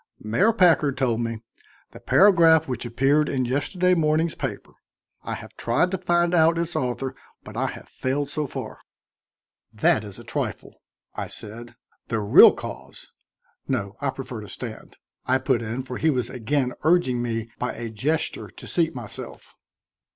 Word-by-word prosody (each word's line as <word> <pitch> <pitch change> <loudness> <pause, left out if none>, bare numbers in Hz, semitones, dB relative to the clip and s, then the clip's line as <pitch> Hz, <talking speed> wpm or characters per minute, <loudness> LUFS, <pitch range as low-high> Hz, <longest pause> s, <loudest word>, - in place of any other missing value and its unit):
"Mayor 145 - +3
Packard 165 - +3
told 120 -4 +1
me 115 -1 -4 0.5
the - - -12
paragraph 165 -5 +5
which 125 -2 -4
appeared 135 +5 +2
in 130 -2 0
yesterday 145 +8 +1
morning's 160 -1 +2
paper. - - -5 0.5
I - - -4
have - - -11
tried 125 +10 +1
to 190 - -2
find 175 -1 +1
out 165 -1 +4
its 170 0 -2
author, 130 +1 -2 0.3
but - - -11
I - - 0
have - - -8
failed 140 +2 -2
so 145 +1 -3
far." - - -7 0.9
"That 110 0 +2
is 100 -2 -8
a - - -11
trifle," - - -5 0.3
I - - -4
said. 115 +3 -7 0.3
"The 115 - -1
real 105 -1 +8
cause - - -9 0.6
no, 100 0 -2
I 140 - 0
prefer 130 -4 -6
to 105 - -10
stand," 115 +2 -8 0.3
I 130 - +4
put 130 -2 0
in, 115 +3 -4
for 125 -1 -6
he 160 - +3
was 125 -5 -1
again 125 +1 -1
urging 155 -7 +2
me 115 -1 -3
by 125 - -2
a 115 -1 -6
gesture 145 +9 -1
to - - -12
seat 165 -4 0
myself. 120 -4 -8
130 Hz, 165 wpm, -24 LUFS, 120-160 Hz, 0.9 s, real